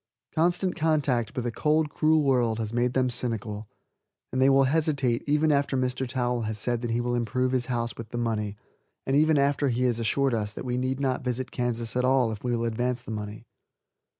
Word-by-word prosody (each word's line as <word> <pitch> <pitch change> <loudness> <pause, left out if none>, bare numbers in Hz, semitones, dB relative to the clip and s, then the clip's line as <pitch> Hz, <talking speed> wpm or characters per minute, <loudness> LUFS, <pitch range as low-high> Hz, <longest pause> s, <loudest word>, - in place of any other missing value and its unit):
Constant 175 +3 +1
contact 145 -7 +1
with 125 - -2
a 120 - -1
cold, 150 +4 +1
cruel 155 0 +3
world 125 -5 +2
has 110 -1 -4
made 120 +1 +1
them 130 -1 +3
cynical, 110 -3 -3 0.7
and 130 - +1
they 135 - +6
will 135 0 +5
hesitate 140 -4 +1
even 150 +2 +3
after 140 -1 +1
Mr. 130 0 -1
Towel 125 -1 -1
has 110 -1 -3
said 120 +2 -1
that 120 - -3
he 115 +1 0
will 120 0 -1
improve 120 +2 0
his 130 -2 0
house 120 -2 -2
with 115 -2 -8
the 120 - -5
money, 105 -3 -2 0.5
and 135 - +1
even 155 +1 +4
after 140 0 +2
he 125 +1 0
has 120 -2 +1
assured 135 +3 +1
us 105 -2 -2
that - - -7
we 125 -1 -1
need 130 +1 -1
not 130 -2 -1
visit 125 0 -3
Kansas 120 -2 -2
at 125 - +1
all 130 -2 +3
if 105 - -7
we 125 - -2
will 115 -1 0
advance 120 +2 -1
the 115 - -7
money. 105 +1 -6
125 Hz, 215 wpm, -27 LUFS, 115-135 Hz, 0.7 s, they